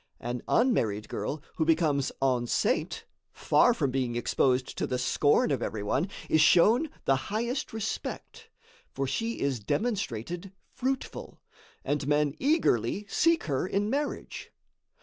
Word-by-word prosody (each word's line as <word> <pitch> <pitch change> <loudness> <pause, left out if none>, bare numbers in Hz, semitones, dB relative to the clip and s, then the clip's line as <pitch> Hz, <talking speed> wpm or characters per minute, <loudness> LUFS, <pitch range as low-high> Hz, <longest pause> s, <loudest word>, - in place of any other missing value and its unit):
An 120 0 -4
unmarried 115 - +1
girl 150 +1 -4
who 160 - +2
becomes 155 -4 +2
enceinte, 125 -3 0 0.3
far - - +3
from 135 - 0
being 125 -2 -1
exposed 125 +2 +1
to - - 0
the 125 - -1
scorn 145 +4 +2
of 130 -4 0
every 105 -3 -3
one, 140 - 0 0.2
is 155 - +3
shown 220 - +5 0.2
the 135 - +4
highest 235 +6 -2
respect; 335 - -5 0.4
for 135 - -3
she 225 - -2
is 140 -3 0
demonstrated 175 - -3 0.2
fruitful, 265 +1 -4 0.5
and 145 0 -1
men 150 -1 +2
eagerly 210 - +1
seek 330 +7 +2
her 140 +4 -1
in 205 +3 0
marriage. 290 +1 -3
150 Hz, 130 wpm, -28 LUFS, -, 0.5 s, shown